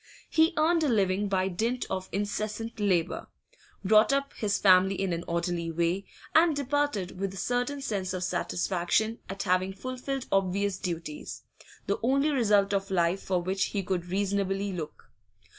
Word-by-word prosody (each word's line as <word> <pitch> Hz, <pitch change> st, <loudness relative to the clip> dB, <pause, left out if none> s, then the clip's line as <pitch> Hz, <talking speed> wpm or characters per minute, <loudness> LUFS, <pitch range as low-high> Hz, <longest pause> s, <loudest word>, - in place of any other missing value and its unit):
He 320 Hz, +1 st, +4 dB
earned 325 Hz, +1 st, +3 dB
a -, -, +2 dB
living 200 Hz, -2 st, +1 dB
by 190 Hz, -1 st, +1 dB
dint 230 Hz, +7 st, -1 dB
of 185 Hz, 0 st, -4 dB
incessant 215 Hz, +3 st, -3 dB
labour, 185 Hz, -5 st, 0 dB, 0.6 s
brought 215 Hz, +5 st, +5 dB
up 275 Hz, 0 st, 0 dB
his 205 Hz, -2 st, 0 dB
family 190 Hz, 0 st, +5 dB
in 190 Hz, -2 st, 0 dB
an 170 Hz, 0 st, -3 dB
orderly 170 Hz, 0 st, -1 dB
way, 170 Hz, +4 st, 0 dB, 0.3 s
and 320 Hz, -1 st, +5 dB
departed 280 Hz, -10 st, -1 dB
with 195 Hz, -1 st, -3 dB
a -, -, -8 dB
certain 245 Hz, +7 st, -1 dB
sense 195 Hz, -7 st, -2 dB
of 185 Hz, -1 st, -3 dB
satisfaction 185 Hz, +5 st, 0 dB
at 195 Hz, +1 st, -4 dB
having 185 Hz, +1 st, +1 dB
fulfilled 255 Hz, +4 st, -4 dB
obvious 195 Hz, 0 st, +1 dB
duties 165 Hz, -5 st, -5 dB, 0.4 s
the -, -, -1 dB
only 275 Hz, +5 st, +2 dB
result 205 Hz, -7 st, +3 dB
of 195 Hz, 0 st, -1 dB
life 180 Hz, 0 st, +1 dB
for 180 Hz, -2 st, -1 dB
which 190 Hz, +1 st, 0 dB
he 200 Hz, -2 st, -3 dB
could 180 Hz, -1 st, -2 dB
reasonably 195 Hz, +1 st, -1 dB
look. 160 Hz, -4 st, -7 dB
195 Hz, 160 wpm, -28 LUFS, 185-230 Hz, 0.6 s, brought